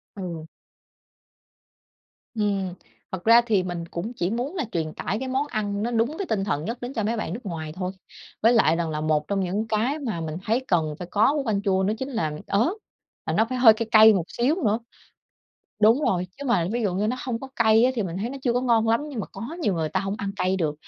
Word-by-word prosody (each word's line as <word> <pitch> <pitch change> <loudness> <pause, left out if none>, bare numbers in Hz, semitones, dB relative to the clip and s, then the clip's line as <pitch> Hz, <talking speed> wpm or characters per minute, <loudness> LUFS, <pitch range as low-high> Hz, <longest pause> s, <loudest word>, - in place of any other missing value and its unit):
Ừ. 175 -5 -6 1.9
Ừm. 200 -4 -1 0.4
Thật 185 -1 -5
ra 230 +1 +8
thì 210 -5 +2
mình 175 -2 -4
cũng 185 +8 -4
chỉ 175 +1 -1
muốn 250 - -3
là 330 - -1
truyền 160 -2 -2
tải 195 +6 -3
cái 260 +2 -4
món 265 +3 0
ăn 205 -5 -2
nó 235 - -1
đúng 235 +6 0
với 395 - -3
tinh 205 - -1
thần 155 -7 -1
nhất 230 +6 -4
đến 245 +2 -5
cho 220 -5 -2
mấy 225 +3 0
bạn 215 -7 -3
nước 220 - -5
ngoài 160 -4 -5
thôi. 185 +2 -4 0.5
Với 225 +2 +6
lại 190 -9 +4
rằng 165 -1 -1
là 150 0 -3
một 155 -1 0
trong 200 -1 0
những 195 +4 -2
cái 230 +8 0
mà 225 - -3
mình 160 -1 -4
thấy 235 +4 0
cần 160 -4 +1
phải 180 - -7
có 215 +6 +4
của 295 - 0
canh 210 -4 0
chua 190 -2 +2
nó 195 +2 +1
chính 265 - -4
là 195 - -2
ớt, 225 +10 +2 0.6
và - - -1
nó 220 - +3
phải 255 0 -2
hơi 240 -3 +9
cay 225 +1 -4
cay 220 0 +8
một 180 -4 0
xíu 250 +6 +1
nữa. 215 +1 +2 1.0
Đúng 225 +6 +5
rồi, 185 -10 0
chứ 285 - -6
mà, 235 -9 +2
ví 240 0 -1
dụ 195 -4 0
như, 200 +3 0
nó 245 +4 -1
hông 235 -3 -3
có 270 - -7
cay 220 0 +5
á, 255 - +4
thì 230 - 0
mình 175 -3 -4
thấy 215 +5 -3
nó 275 - -6
chưa 245 - +2
có 245 - +1
ngon 230 -3 +2
lắm, 230 +3 +3
nhưng 265 -6 -4
mà - - -5
có 195 - -11 0.2
nhiều 205 - +1
người 160 -2 -1
ta 170 +5 -1
hông 195 +1 -3
ăn 200 -1 -3
cay 185 -1 +1
được. 155 -5 -1
210 Hz, 255 wpm, -25 LUFS, 180-235 Hz, 1.9 s, hơi